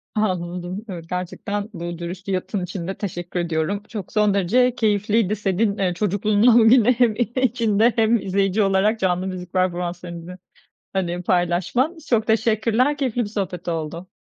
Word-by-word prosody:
Anladım. 180 0 -2
Evet, 170 -3 -7
gerçekten 200 +3 -4
bu 170 -1 -5
dürüst 180 +3 -7
yanıtın 190 0 -2
için 180 -1 -5
de 190 - -4
teşekkür 175 -2 -4
ediyorum. 170 +4 -1
Çok, 210 -4 -7
son 210 -2 +3
derece 235 +6 +2
keyifliydi 210 -1 +1
senin, 200 +1 0
eee, 185 -2 0
çocukluğundan 210 +4 +3
bugüne 235 +1 +6
hem 240 -3 +2 0.2
içinde 235 -3 +2
hem 225 +1 +3
izleyici 195 +2 +1
olarak 200 +3 +2
canlı 185 0 0
müzik 180 -1 -7
performanslarını, 180 -1 -3 0.6
hani, 180 -2 -2
paylaşman. 180 - +1
Çok 220 -3 +2
teşekkürler, 225 +5 +2
keyifli 250 -4 -1
bir 205 - -5
sohbet 185 -5 -4
oldu. 165 +2 -4
195 Hz, 145 wpm, -22 LUFS, 180-220 Hz, 0.6 s, bugüne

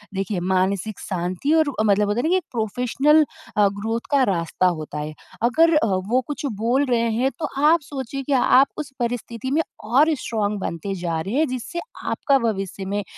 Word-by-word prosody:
देखिए 195 0 -2
मानसिक 190 +3 0
शांति 185 - -2
और 310 -2 +2
अ, - - +3
मतलब 205 -1 +3
होता 205 +3 0
है - - 0
ना 315 - +1
कि 365 - +3
एक 370 - -3
प्रोफ़ेशनल 250 +7 +2 0.3
अ, 205 -1 +6
ग्रोथ 225 +2 -1
का 280 -2 +4
रास्ता 170 +1 0
होता 155 -3 -3
है। 150 +1 -5 0.3
अगर 320 +7 +4
अ, 300 - +3
वो 200 +5 +1
कुछ 295 0 -4 0.2
बोल 255 +5 +2
रहे 230 -1 +2
हैं 255 +4 +1
तो 305 - -2 0.2
आप 335 0 +3
सोचिए 275 -1 -5
कि 285 - +1
आप 265 +2 +5
उस 295 -3 -5
परिस्थिति 240 +1 -3
में 305 +3 +3 0.3
और 300 +6 +5
स्ट्रांग 210 -6 -2
बनते 190 +2 -4
जा 165 -2 -1
रहे 195 +8 -4
हैं 310 +2 +3
जिससे 255 +7 -4 0.3
आपका 275 -2 +2
भविष्य 195 -1 -5
में 205 +2 -2
230 Hz, 195 wpm, -22 LUFS, 195-275 Hz, 0.3 s, अ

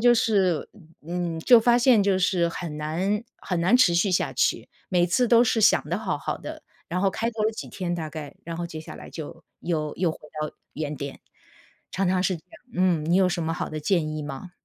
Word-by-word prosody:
就 240 +1 +6
是 195 -8 +2 0.4
嗯， 175 -2 -2
就 240 +8 +7
发 240 +1 +4
现 240 -2 +5
就 195 -1 +2
是 180 -2 +2
很 165 -2 -5
难 185 +9 -1
很 180 - -3
难 185 +8 +5
持 190 -9 +5
续 190 +2 +2
下 180 - +1
去， - - 0 0.2
每 175 -2 +3
次 245 +9 +2
都 235 0 +6
是 225 -1 +2
想 - - +5
得 - - -1
好 - - -2
好 - - -3
的， - - -8 0.3
然 180 +1 -1
后 195 -1 +3
开 225 +3 -2
头 220 -1 -2
了 220 - +3
几 220 - -7
天 175 -3 -3
大 160 -2 -4
概， 150 -2 -8
然 165 0 -5
后 175 - -3
接 160 - -8
下 155 - -9
来 - - -10
就 165 +1 -8 0.2
又 155 -3 -2
又 175 -3 +1
回 - - -12 0.2
到 155 - -4 0.2
原 150 0 -3
点， 140 0 -6 0.7
常 195 +1 0
常 185 0 +2
是 185 -2 +1
这 160 - -16
样， 330 - -17
嗯， 180 -3 +2
你 170 - +2
有 190 - +5
什 175 - -1
么 165 0 -1
好 - - -4
的 155 0 -4
建 170 0 +1
议 155 - -4
吗？ 145 +5 -7
175 Hz, 250 characters per minute, -25 LUFS, 160-205 Hz, 0.7 s, 就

